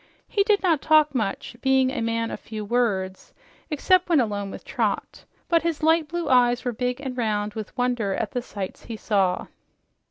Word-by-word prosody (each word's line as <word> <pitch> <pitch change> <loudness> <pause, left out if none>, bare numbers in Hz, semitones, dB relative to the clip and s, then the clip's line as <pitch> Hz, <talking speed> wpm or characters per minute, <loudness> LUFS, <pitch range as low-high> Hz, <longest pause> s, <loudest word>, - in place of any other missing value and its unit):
He 405 - +1
did 405 0 +2
not 330 -6 +3
talk 310 -2 +4
much, 220 -1 -2
being 265 -1 +3
a 260 - -3
man 230 0 -1
of - - -5
few 215 -1 -7
words 200 -5 -1 0.4
except 360 +4 +2
when 330 -4 +5
alone 205 -4 -1
with - - -9
Trot, - - -2 0.2
but 335 -1 +3
his 330 -2 -2
light 320 0 +3
blue 345 +2 -3
eyes 245 -1 +3
were 245 - -1
big 250 +2 -2
and 265 -3 -5
round 210 -3 -1
with 215 -2 -7
wonder 245 -6 0
at - - -2
the 250 - -2
sights 200 -5 -7
he 225 - -6
saw. 195 -4 +1
245 Hz, 190 wpm, -24 LUFS, 215-300 Hz, 0.4 s, when